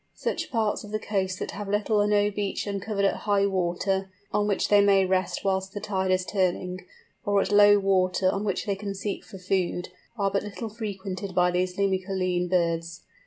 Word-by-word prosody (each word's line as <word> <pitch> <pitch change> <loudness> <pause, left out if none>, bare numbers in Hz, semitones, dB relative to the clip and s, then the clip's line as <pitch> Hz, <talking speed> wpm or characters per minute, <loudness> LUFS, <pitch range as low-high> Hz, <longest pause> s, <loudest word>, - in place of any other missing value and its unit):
Such - - -3
parts 220 -4 0
of 210 - -10
the 215 - -1
coast 190 -3 -2
that - - -4
have 205 -1 -6
little 210 +1 +2
or 205 - +2
no 205 0 +3
beach 200 -1 -2
uncovered 200 0 -1
at - - +1
high 200 -1 +3
water, 190 +1 0 0.2
on 205 0 +2
which 200 - +1
they 205 -1 +6
may 195 -1 +4
rest 185 0 0
whilst 190 0 0
the - - -2
tide 190 -2 -1
is 185 0 +2
turning, 185 -2 -1 0.4
or 205 -1 +2
at 195 - 0
low 205 0 +7
water 185 -1 +2
on 200 - -2
which 200 -3 -1
they 200 -2 0
can 200 0 -5
seek 200 +1 -4
for 195 - -11
food, 180 -1 -1 0.3
are 200 -2 +1
but 200 - +1
little 210 +2 -6
frequented 200 -3 -5
by 180 0 +4
these 180 +1 -1
Limicoline 185 -2 0
birds. 170 -1 0
195 Hz, 200 wpm, -26 LUFS, 185-205 Hz, 0.4 s, low